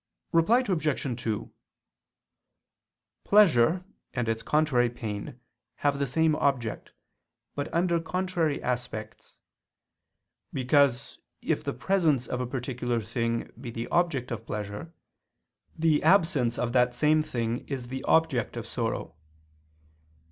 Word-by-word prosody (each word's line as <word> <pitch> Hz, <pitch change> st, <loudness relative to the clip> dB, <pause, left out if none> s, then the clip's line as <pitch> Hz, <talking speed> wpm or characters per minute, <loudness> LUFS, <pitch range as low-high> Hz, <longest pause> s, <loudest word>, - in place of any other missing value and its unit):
Reply 215 Hz, +10 st, +4 dB
Obj. 150 Hz, -, -1 dB
2: 110 Hz, -2 st, -3 dB, 1.7 s
Pleasure 180 Hz, -, +4 dB, 0.3 s
and 125 Hz, -2 st, -1 dB
its 115 Hz, 0 st, -1 dB
contrary 150 Hz, -6 st, +2 dB
pain 115 Hz, 0 st, -6 dB, 0.4 s
have 145 Hz, -1 st, 0 dB
the 140 Hz, -, 0 dB
same 160 Hz, +4 st, +2 dB
object, 120 Hz, -6 st, -1 dB, 0.6 s
but 145 Hz, 0 st, -4 dB
under 170 Hz, 0 st, +2 dB
contrary 170 Hz, -3 st, -1 dB
aspects: 120 Hz, -3 st, -5 dB, 1.1 s
because 130 Hz, -1 st, +2 dB, 0.2 s
if -, -, 0 dB
the -, -, -2 dB
presence 155 Hz, -2 st, +1 dB
of 125 Hz, +1 st, -3 dB
a 125 Hz, -, -2 dB
particular 125 Hz, -1 st, -2 dB
thing 115 Hz, +1 st, -2 dB
be 125 Hz, -, -6 dB
the 115 Hz, 0 st, -5 dB
object 150 Hz, -9 st, +1 dB
of 115 Hz, -1 st, -5 dB
pleasure, 105 Hz, +8 st, -5 dB, 0.9 s
the 160 Hz, -2 st, +3 dB
absence 160 Hz, -11 st, +3 dB
of 120 Hz, -1 st, -1 dB
that 125 Hz, -1 st, +3 dB
same 155 Hz, +4 st, +3 dB
thing 120 Hz, -4 st, -2 dB
is 130 Hz, -4 st, -5 dB
the 130 Hz, +1 st, -4 dB
object 160 Hz, -8 st, +2 dB
of -, -, -4 dB
sorrow. -, -, -3 dB
130 Hz, 120 wpm, -28 LUFS, 120-160 Hz, 1.7 s, Reply